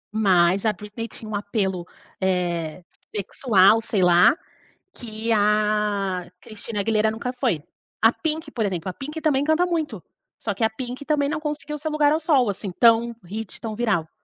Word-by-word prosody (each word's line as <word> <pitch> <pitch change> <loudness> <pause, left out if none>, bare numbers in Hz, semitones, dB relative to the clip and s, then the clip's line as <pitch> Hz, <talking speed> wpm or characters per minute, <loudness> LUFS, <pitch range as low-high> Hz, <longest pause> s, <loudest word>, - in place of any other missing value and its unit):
Mas 190 -2 +3
a 215 - +4
Britney 210 +4 -7
tinha 220 - -11
um - - -6
apelo, 195 -4 -2 0.3
eh, 175 -3 -1 0.3
sexual, 210 +1 +4
sei 200 -4 0
lá, 175 - +6 0.6
que 225 -1 -5
a 210 -3 +1
Cristina 210 0 -6
Aguilera 220 +1 +2
nunca 240 +3 -4
foi. 245 - -1 0.4
A 225 +1 +6
Pink, 315 -1 -3
por 230 -6 -2
exemplo, 185 -2 -3
a 185 - -2
Pink 300 - -6
também 285 -3 +2
canta 315 +4 +3
muito, 310 - -2 0.4
só 210 - -2
que 210 +3 -1
a 220 - +2
Pink 250 +4 -6
também 290 -1 +1
não 305 - -1
conseguiu 300 0 -4
ser 310 +2 -3
lugar 300 -1 +3
ao 315 - +2
sol 280 -8 +3
assim 195 -1 -5
tão 235 +3 +4
hit, 210 +3 -7
tão 220 -2 -5
viral. 205 -9 0
220 Hz, 175 wpm, -23 LUFS, 195-265 Hz, 0.6 s, lá